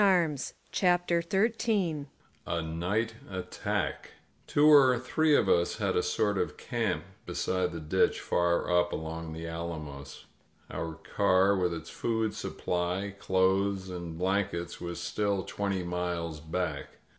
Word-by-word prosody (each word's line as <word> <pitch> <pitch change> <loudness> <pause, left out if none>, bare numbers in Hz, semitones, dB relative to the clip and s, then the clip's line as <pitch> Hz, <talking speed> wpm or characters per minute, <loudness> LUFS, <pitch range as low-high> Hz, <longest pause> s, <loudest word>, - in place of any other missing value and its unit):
• 190 -4 +5
• 150 - -4
• 135 - -5 0.2
CHAPTER 175 -2 +2
XIII 195 -5 +1 0.4
A 85 - 0
NIGHT 90 +8 -1 0.2
ATTACK 95 -1 -3 0.4
TWO 145 +1 +4
or 135 -4 +7
three 150 +5 +2
of - - +3
us 85 0 +2
had - - 0
a - - +3
sort 105 -2 +1
of - - -2
camp 105 -10 -1 0.2
beside 95 -2 0
the 85 - -5
ditch 75 0 +2
far 85 0 +1
up 85 0 +3
along 80 0 -4
the 80 +1 -6
alamos. 80 -4 -6 0.5
Our 80 -1 -4
car, 95 +5 +3
with 90 -2 +1
its 80 - -8
food 110 -2 -1
supply, 90 +1 -2
clothes 95 0 +1
and 85 -2 -6
blankets, 90 -1 -1
was 85 -1 -4
still 100 +2 0
twenty 100 -1 -2
miles 85 -2 -2
back. 85 +4 -3
95 Hz, 140 wpm, -30 LUFS, 85-115 Hz, 0.5 s, or